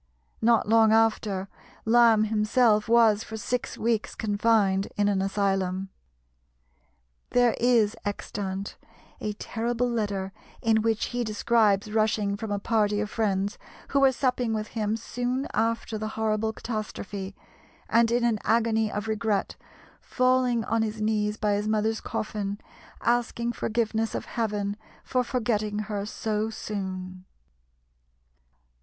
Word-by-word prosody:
Not 230 -1 +3
long 220 0 +5
after, 215 -3 +2 0.4
Lamb 225 -1 +5
himself 215 +1 +2
was 225 -2 +5
for 220 - -7
six 245 +3 -3
weeks 225 -1 -1
confined 205 -2 +2
in 205 0 +3
an 200 -2 +1
asylum. 195 -1 0 1.4
There 245 -1 +3
is 230 -3 +3
extant 200 -1 -4 0.4
a 210 - -3
terrible 235 +3 -2
letter 200 -5 -2 0.3
in 220 -1 +2
which 225 -1 +1
he 245 0 0
describes 215 -1 +2
rushing 215 -2 +1
from 210 +1 -5
a 205 - 0
party 210 0 +1
of 210 +1 -3
friends 200 -2 -1 0.3
who 280 - +2
were 270 -1 +6
supping 250 -3 0
with 215 0 -3
him 215 -1 -1
soon 245 +4 -3
after 225 -1 -1
the 215 - -3
horrible 220 0 0
catastrophe, 205 -3 -5 0.5
and 230 0 +4
in 240 +1 +1
an 230 -3 +2
agony 225 -1 +2
of 210 +1 -4
regret 215 -2 -1 0.4
falling 255 -2 +1
on 230 0 0
his 220 0 -2
knees 215 -1 0
by 210 -2 +1
his 205 +1 -1
mother's 220 +1 0
coffin, 205 -1 -3 0.4
asking 235 0 0
forgiveness 225 -1 -1
of - - -3
Heaven 210 -3 -2 0.3
for 255 -1 0
forgetting 220 -4 -1
her 210 -1 -3
so 215 0 -2
soon. 185 -4 -5
220 Hz, 130 wpm, -26 LUFS, 205-230 Hz, 1.4 s, were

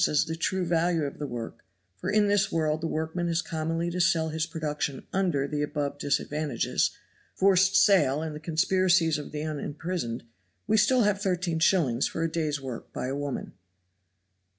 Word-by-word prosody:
as 150 - +2
the 160 - -4
true 185 +2 -1
value 170 -1 +1
of 140 - -5
the 145 - -3
work, 120 -3 -6 0.3
for 180 - -4
in 205 0 +3
this 205 -1 +2
world 155 -1 0
the 165 - -1
workman 160 +2 -2
has 170 +1 0
commonly 165 +1 -2
to 180 +1 -1
sell 165 -1 +2
his 160 +1 -2
production 150 -4 -3
under 175 -8 +1
the 150 0 -2
above 145 -1 -2
disadvantages, 145 -2 0 0.5
forced 190 0 +4
sale 150 -10 +5
and 155 -2 -4
the - - -6
conspiracies 165 0 +2
of 150 - -8
the 150 0 -4
unimprisoned 150 -3 -4 0.4
we 215 - +2
have 215 - +6
still 255 0 +4
13s. 180 - +1
for 165 - -3
a 165 - -1
day's 155 -3 -1
work 130 -4 -7
by - - -4
a 135 +2 -2
woman. 145 -1 -4
160 Hz, 175 wpm, -27 LUFS, 150-180 Hz, 0.5 s, have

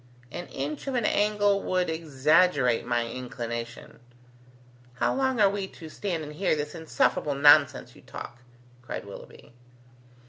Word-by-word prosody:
"An 175 0 -6
inch 145 - -5
of 270 - -2
an 235 -3 0
angle 205 -1 +2
would 185 -1 0
exaggerate 155 -4 +2
my 120 -1 0
inclination." 120 -1 -6 1.0
"How - - +1
long 260 -2 0
are 205 - +6
we 195 -1 -2
to 160 -4 -12
stand 170 -1 -4
and 150 0 -8
hear 185 +1 +1
this 150 0 -4
insufferable 160 -3 0
nonsense 145 +1 +5
you - - -16
talk?" 120 - -9 0.4
cried 125 - -6
Willoughby. 100 +3 -12
155 Hz, 140 wpm, -27 LUFS, 130-195 Hz, 1.0 s, are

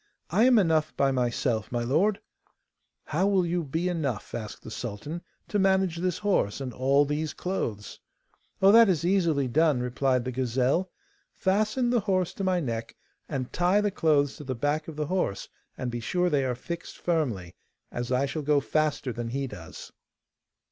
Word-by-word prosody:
I 225 - +4
am 255 -2 +6
enough 160 -5 +2
by 140 -1 +3
myself, 120 -3 -1
my 120 -1 -1
lord.' 175 - +2 0.9
'How 195 - +1
will 195 -3 +3
you 170 0 -1
be 160 +5 -2
enough,' 145 -11 -2
asked 110 -2 -6
the 110 - -9
sultan, 120 +10 -5 0.3
'to 205 - 0
manage 190 -3 +2
this 180 +1 -1
horse 200 - 0
and 130 -3 -5
all 140 +3 +3
these 150 +2 -2
clothes?' 115 - -4 0.6
'Oh, 195 - +8
that 230 -1 +7
is 170 -3 +1
easily 170 -7 +2
done,' 150 +1 +3
replied 125 0 0
the 130 - -2
gazelle. 130 +8 0 0.5
'Fasten 215 +6 +1
the 245 - +3
horse 185 -4 0
to 195 - -5
my 185 -1 +2
neck 115 -6 -4 0.3
and 130 -4 -4
tie 180 +3 +3
the 210 -1 +1
clothes 145 -6 +2
to - - -8
the 130 -2 -3
back 145 +5 -1
of 160 - -7
the 150 0 -2
horse, 180 - -2 0.3
and 125 -1 -3
be 120 - -3
sure 180 +10 0
they 140 -2 +2
are 125 -1 -1
fixed 170 +7 -7
firmly, 120 - -1 0.4
as 120 +1 -4
I 130 +2 +2
shall 145 +3 -3
go 145 0 +3
faster 150 -3 0
than 120 0 -4
he 135 +3 -2
does. 95 -10 -9
150 Hz, 180 wpm, -27 LUFS, 125-180 Hz, 0.9 s, Oh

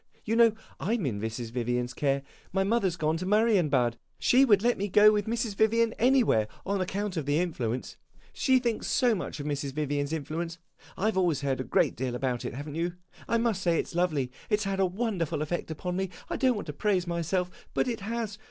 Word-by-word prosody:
You 225 - 0
know 230 -1 +6 0.3
I 220 +5 0
'm 210 -9 -2
in 105 -6 -2
Mrs. 110 +1 -4
Vivian's 125 +1 -1
care. 140 -1 0 0.3
My 190 +1 +1
mother 205 -1 +2
's 170 - -5
gone 160 0 +1
to 185 - -4
Marienbad. 175 - +3 0.2
She 260 +2 +5
would 205 -5 +4
let 240 0 +3
me 200 - 0
go 210 +2 +7
with 210 -1 0
Mrs. 230 -1 -1
Vivian 225 +2 +3
anywhere, 240 - +4 0.2
on 200 0 0
account 195 +1 -2
of 150 -3 -3
the 145 +1 +2
influence 130 -9 -2 0.4
she 260 -1 +3
thinks 240 -3 -1
so 250 -3 +3
much 180 -5 -4
of 145 - -5
Mrs. 145 -2 -2
Vivian's 145 -1 -1
influence. 160 +2 -3 0.4
I 195 - -1
have 215 -3 +2
always 170 -6 +1
heard 135 -2 -1
a - - -2
great - - +2
deal 125 0 -3
about 125 -1 -2
it, - - -4
have 145 +3 -6
n't 150 +1 -6
you? 170 +1 -1 0.3
I 230 - +2
must 230 -4 0
say 170 -3 +2
it - - -1
's - - -10
lovely; 155 -7 0 0.2
it 210 - +2
's - - 0
had 195 -1 -2
a 190 - +4
wonderful 185 -7 -1
effect 170 +3 -3
upon 180 +3 -3
me. 190 0 -1 0.2
I - - 0
don't 260 -3 +2
want 205 - -4
to 150 - -5
praise 185 +2 +1
myself, 175 +1 -1 0.2
but - - +2
it 235 -2 -2
has. 215 0 -4
180 Hz, 230 wpm, -28 LUFS, 145-215 Hz, 0.4 s, go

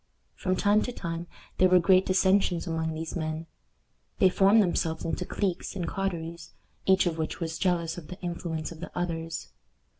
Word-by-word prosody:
From 185 -1 -1
time 205 +2 +3
to 250 - -2
time 170 -6 -5 0.3
there 185 - +6
were 185 - +7
great 185 +1 +4
dissensions 190 -2 +3
among 160 -2 -2
these 160 0 -5
men. 160 -1 -3 0.7
They 190 - +6
formed 195 +4 +5
themselves 160 -3 -1
into 175 +2 -2
cliques 190 -2 -2
and 175 -3 -2
coteries, 170 -4 -4 0.3
each 190 0 +5
of 165 -2 -1
which 160 - -3
was 165 -1 -3
jealous 175 -2 0
of 155 - -13
the 180 - -9
influence 170 -3 -4
of 165 - -10
the 175 - -6
others. 165 - -3
175 Hz, 175 wpm, -28 LUFS, 165-185 Hz, 0.7 s, were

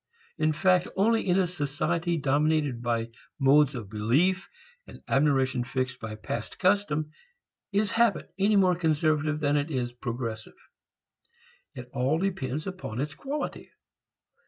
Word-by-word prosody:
In 155 0 +3
fact 180 +4 +3
only 225 +2 +2
in 180 0 +3
a 190 - +3
society 165 +1 -1
dominated 145 -2 +1
by 115 -1 -1 0.3
modes 140 +1 +4
of 110 -5 -6
belief 150 - +1 0.4
and - - -13
admiration 135 -3 +2
fixed 130 0 -3
by 115 -1 -6
past 110 +1 -5
custom 180 -6 +1 0.6
is 205 +1 +1
habit 225 -7 +1
any 205 +2 +3
more 185 -2 +5
conservative 155 -2 +1
than 145 -1 +2
it 145 +2 -1
is 125 -4 -2
progressive. 115 -3 -5 1.2
It 125 0 -8
all 135 +4 +1
depends 155 -6 -2
upon 185 - -5
its 145 +2 -2
quality. 280 - -5
150 Hz, 135 wpm, -27 LUFS, 130-180 Hz, 1.2 s, more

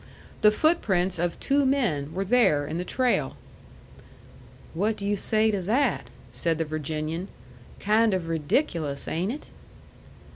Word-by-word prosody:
The 210 - +7
footprints 195 - +1
of 175 0 -1
two 280 +1 +2
men 220 - 0
were 190 +4 -2
there 195 -10 +3
in 160 +4 -4
the - - -2
trail. 255 +6 0 1.4
"What 210 +6 0
do 200 - -6
you 205 +1 +1
say 220 +2 +2
to 200 -2 -1
that?" 235 +6 0 0.2
said 160 +6 -1
the 165 - -1
Virginian. 155 +3 -3 0.5
"Kind 215 0 +3
of 175 -3 -3
ridiculous, 155 - -1
ain't 180 +6 -1
it?" 295 - -9
185 Hz, 140 wpm, -26 LUFS, 160-220 Hz, 1.4 s, The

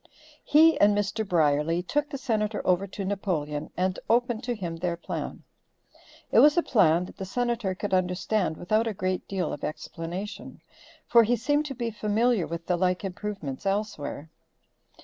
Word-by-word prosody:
He 315 0 +5
and 205 0 +5
Mr. 205 +2 -1
Brierly 165 -2 +2
took 295 +9 -1
the 275 - -4
Senator 220 -5 -1
over 185 +2 +2
to 195 +1 -6
Napoleon 165 -7 -2
and 185 +1 0
opened 240 0 +2
to 245 -1 -1
him 175 -5 -5
their 170 0 -2
plan. - - -5 0.9
It - - +6
was 295 +3 +6
a 345 - +4
plan 175 -6 +3
that - - -13
the - - -5
Senator 235 -2 -1
could 200 +1 -4
understand 180 -1 0
without 215 +6 +1
a 220 - -2
great 185 0 -2
deal 190 -2 -2
of 145 - -7
explanation, 170 +6 -6 0.5
for 235 - +6
he 235 +2 +2
seemed 290 +6 0
to 270 - -6
be 235 -1 -3
familiar 215 -1 +1
with 170 0 -5
the 180 -1 +1
like 180 +1 +1
improvements 190 -7 -5
elsewhere. 195 -7 -3
195 Hz, 170 wpm, -27 LUFS, 175-225 Hz, 0.9 s, It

